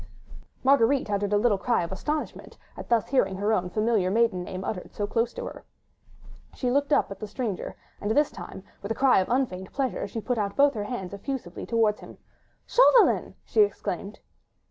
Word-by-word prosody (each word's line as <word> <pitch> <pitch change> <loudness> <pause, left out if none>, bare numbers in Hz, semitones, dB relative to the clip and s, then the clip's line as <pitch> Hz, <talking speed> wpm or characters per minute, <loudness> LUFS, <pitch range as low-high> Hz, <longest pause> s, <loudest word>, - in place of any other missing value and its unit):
Marguerite 265 -3 +3
uttered 200 0 0
a 205 - +4
little 205 -2 +2
cry 235 -2 +1
of 170 - -6
astonishment, 300 +11 -4 0.2
at - - -9
thus 230 -3 +2
hearing 195 -8 +2
her 205 +3 0
own 180 -4 0
familiar 215 -1 +1
maiden 215 -3 +2
name 185 +1 -6
uttered 180 - -5
so 205 - -1
close 230 +3 0
to - - -6
her. - - -8 0.9
She 250 -2 -1
looked 285 +2 +1
up 285 - +3
at 195 - -7
the 215 - -5
stranger, 210 -2 -4 0.3
and 205 - -2
this 290 +6 +3
time, 185 +1 -9 0.2
with 200 - -5
a - - 0
cry 265 -3 +4
of 185 - -1
unfeigned 235 -8 -1
pleasure, 270 -2 -2
she 225 - -5
put 240 +1 -2
out 200 -1 -2
both 285 0 +4
her 210 -3 -4
hands 200 -5 -5
effusively 200 -3 -5
towards 225 -2 +2
him. - - -12 0.5
"Chauvelin!" - - +4
she 435 - +3
exclaimed. 410 - -1
220 Hz, 190 wpm, -26 LUFS, 195-260 Hz, 0.9 s, a